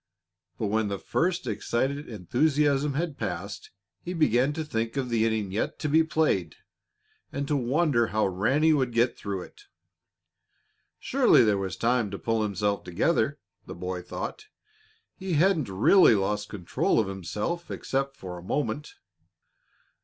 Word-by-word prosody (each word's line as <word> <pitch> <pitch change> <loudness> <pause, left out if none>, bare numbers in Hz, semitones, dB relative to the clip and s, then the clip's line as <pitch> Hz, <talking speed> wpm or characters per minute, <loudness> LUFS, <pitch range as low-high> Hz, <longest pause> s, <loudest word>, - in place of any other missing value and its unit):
But - - -2
when 110 0 +1
the 100 -1 -2
first 170 - -1
excited 130 +5 -2
enthusiasm 140 - +1
had 160 -1 -2
passed - - -5 0.3
he 180 - -5
began 135 -4 +3
to 160 +1 -4
think 115 -2 -3
of 130 -2 -1
the 115 -1 +2
inning 110 -4 -1
yet 105 - -2
to 155 - -3
be 160 +2 +4
played 150 - 0 0.8
and 140 0 -3
to 150 - +1
wonder 135 -2 +2
how 110 0 +1
Ranny 125 - +2
would 130 -5 0
get 120 +1 +2
through 100 -3 -4
it. 415 - -16 1.3
Surely 265 - +4
there 105 -3 +2
was 95 -1 -4
time 115 +1 +1
to 100 - -5
pull 115 +1 -1
himself 100 -1 -1
together, 90 - +1 0.3
the - - -7
boy 90 0 -4
thought. 425 - -6 0.7
He 190 -3 -4
hadn't 160 - +2
really 115 - +6
lost 105 +1 -1
control 95 +1 0
of 110 - +1
himself 105 - -4
except 135 0 -2
for 90 -2 -7
a - - -13
moment. 145 +6 -3
120 Hz, 150 wpm, -27 LUFS, 100-150 Hz, 1.3 s, really